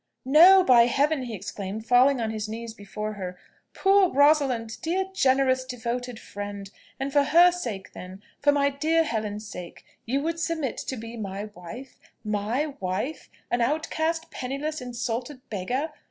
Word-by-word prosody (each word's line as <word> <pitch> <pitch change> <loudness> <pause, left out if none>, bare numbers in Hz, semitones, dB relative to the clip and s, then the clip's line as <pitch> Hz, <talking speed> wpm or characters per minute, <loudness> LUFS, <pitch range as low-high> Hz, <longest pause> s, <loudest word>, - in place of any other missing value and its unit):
"No, 350 +8 +8
by 240 -6 +6
Heaven!" 285 +3 +1
he 235 -3 -5
exclaimed, 200 +2 -6
falling 250 +2 +5
on 225 -1 -1
his 215 -1 -4
knees 230 +1 -6
before 210 0 -6
her. 185 -3 -6 0.4
"Poor 390 -1 +4
Rosalind! 270 -6 +2
dear, 365 +4 0
generous, 260 -4 +3
devoted 245 -1 -4
friend! 200 -1 -7 0.3
And 270 +1 -3
for 290 - +5
her 345 +4 +6
sake, 230 - -5
then 185 +2 -10 0.2
for 290 - +4
my 280 0 +2
dear 315 +4 +2
Helen's 215 -5 -3
sake, 180 -4 -9 0.2
you 275 +4 0
would 330 +1 -2
submit 325 -5 -2
to 260 - -4
be 230 +1 -8
my 200 -2 -5
wife 230 +10 -10 0.2
my 220 +8 -1
wife! 190 +11 -3 0.2
an 240 - +1
outcast, 320 +4 -1
penniless, 280 +4 -4
insulted 245 +2 -4
beggar! 250 - -2
250 Hz, 155 wpm, -26 LUFS, 215-295 Hz, 0.4 s, No